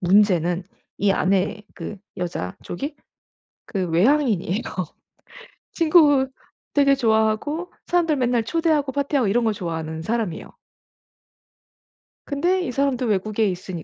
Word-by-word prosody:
문제는 180 -2 +3 0.4
이 200 -1 +3
안에 195 +2 +1
그 210 - -6 0.2
여자 170 - -4
쪽이 280 - -5 0.7
그 190 -4 -2
외향인이에요. 215 - +2 1.1
친구 305 -5 +5 0.5
되게 280 -1 +4
좋아하고 225 +8 +1 0.2
사람들 340 -3 +2
맨날 245 -2 +1
초대하고 310 -1 +1
파티하고 280 -4 0
이런 235 +3 +2
거 220 - +2
좋아하는 160 -3 -4
사람이에요. 215 -3 -3 1.7
근데 350 +6 +1
이 345 - -2
사람도 270 -2 0
외국에 215 0 +1
있으니 180 -2 -5
225 Hz, 275 characters per minute, -23 LUFS, 185-280 Hz, 1.7 s, 친구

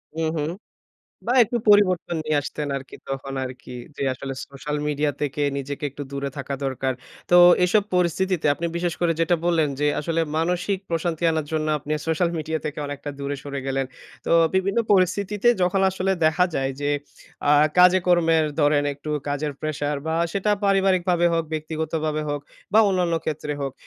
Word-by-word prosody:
হুম, 160 -1 0
হুম। 150 +2 -1 0.8
বা 245 - +1
একটু 240 - -3
পরিবর্তন 185 -4 +4
নিয়ে 155 -1 +1
আসতেন 150 0 -4
আরকি, 135 0 -8
তখন 135 0 -4
আরকি 125 0 -9 0.2
যে - - -4
আসলে 135 +1 -6
সোশ্যাল 150 +2 -5
মিডিয়া 150 0 0
থেকে 145 0 -2 0.2
নিজেকে 140 +2 -5
একটু 145 - -8
দূরে 140 0 -3
থাকা 140 0 -4
দরকার। 130 0 -1 0.4
তো 175 - +7 0.3
এসব 200 +3 +3
পরিস্থিতিতে 180 -1 +1
আপনি 170 - -3
বিশেষ 175 -1 -1
করে 170 -1 +2
যেটা 170 +1 +3
বললেন, 160 -4 +2
যে 150 - +2
আসলে 165 +2 -1 0.2
মানসিক 180 +4 0
প্রশান্তি 165 0 -2
আনার 160 -2 -1
জন্য, 155 -1 0
আপনি 150 +2 -5
সোশ্যাল 165 +2 +1
মিডিয়া 160 +1 -2
থেকে 150 0 -4
অনেকটা 145 0 -6
দূরে 140 0 -3
সরে 140 -1 -5
গেলেন। 135 0 -1 0.4
তো - - -1 0.2
বিভিন্ন 195 +4 +1
পরিস্থিতিতে 200 +4 +2
যখন 180 +2 +2
আসলে 190 +1 0
দেখা 160 +3 +4
যায় 135 0 0
যে, 145 0 0 0.6
আ - - +6 0.3
কাজে 180 +1 +7
কর্মের 165 -3 +4 0.2
ধরেন 145 0 +3
একটু 150 +2 -7 0.2
কাজের 145 +1 -2
প্রেশার 150 -1 -2
বা 160 - 0 0.2
সেটা 200 +1 0
পারিবারিকভাবে 185 -3 +3
হোক, 165 -1 +1
ব্যক্তিগতভাবে 155 0 -2
হোক, 145 -1 -2 0.3
বা 220 - +6
অন্যান্য 180 -3 +1
ক্ষেত্রে 150 -1 -3
হোক। 135 -1 -3
160 Hz, 170 wpm, -23 LUFS, 145-180 Hz, 0.8 s, তো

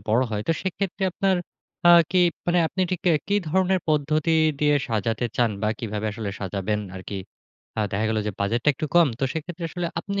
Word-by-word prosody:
বড় 120 +4 +4
হয়। 105 -1 -2
তো - - +5
সেক্ষেত্রে 190 +1 -3
আপনার 190 0 +1 0.5
আ - - +9 0.2
কি 185 - +3 0.3
মানে 175 0 +3
আপনি 190 - -4
ঠিক 180 - -2
ক্যা 170 - +5
কি 200 - +2
ধরনের 190 +2 +2
পদ্ধতি 155 +1 +1 0.3
দিয়ে 150 0 +4
সাজাতে 115 +2 0
চান 120 -2 +3
বা 105 - +2
কিভাবে 110 -1 -3
আসলে 110 -2 -4
সাজাবেন 100 +2 -2 0.2
আরকি? 95 +2 -6 0.6
আ - - +3
দেখা 105 +3 0
গেল 110 - 0
যে 105 - -1
বাজেটটা 115 +7 +1
একটু 155 - -3
কম। 170 -3 +6
তো - - +2
সেক্ষেত্রে 170 +2 -5
আসলে 175 +1 -3
আপনি 200 +1 -3
150 Hz, 195 wpm, -24 LUFS, 110-175 Hz, 0.6 s, আ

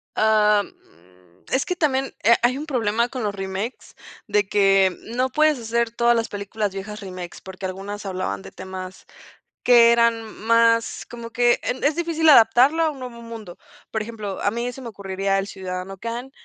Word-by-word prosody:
Am, 210 -1 +3 0.8
es 260 - +1
que 360 - -2
también, 270 -5 0
eh, 230 +4 +6
hay 250 +2 +3
un 295 - -5
problema 235 -4 0
con 255 -2 -5
los 205 -1 -1
remakes. 195 +4 -5 0.3
De 210 -1 +1
que, 195 -2 +3 0.2
no 255 +1 +1
puedes 305 +1 +2
hacer 235 0 -1
todas 235 +1 +3
las 230 -1 -1
películas 205 0 -3
viejas, 210 +2 -7
remakes, 185 -3 -8
porque 190 0 -8
algunas 200 +3 -6
hablaban 185 - -3
de 95 0 -11
temas, 185 0 -8 0.6
que 235 -1 +7
eran 235 -1 +3 0.2
más 230 0 +3
como 235 -1 -8
que 240 0 +3
en 255 - -3
Es 290 +1 +2
difícil 330 -2 +1
adaptarlo 260 +4 +6
a 320 - +2
un 280 - -11
nuevo 245 -2 -8
mundo. 225 -6 -9 0.3
Por 220 - -1
ejemplo, 215 -3 -6
a - - +2
mí 235 +2 -3
se 265 - -11
me 245 - -7
ocurriría, 195 -1 -2
el 195 0 -2
Ciudadano 185 0 -6
Khan, 235 +5 -6
225 Hz, 180 wpm, -22 LUFS, 195-245 Hz, 0.8 s, que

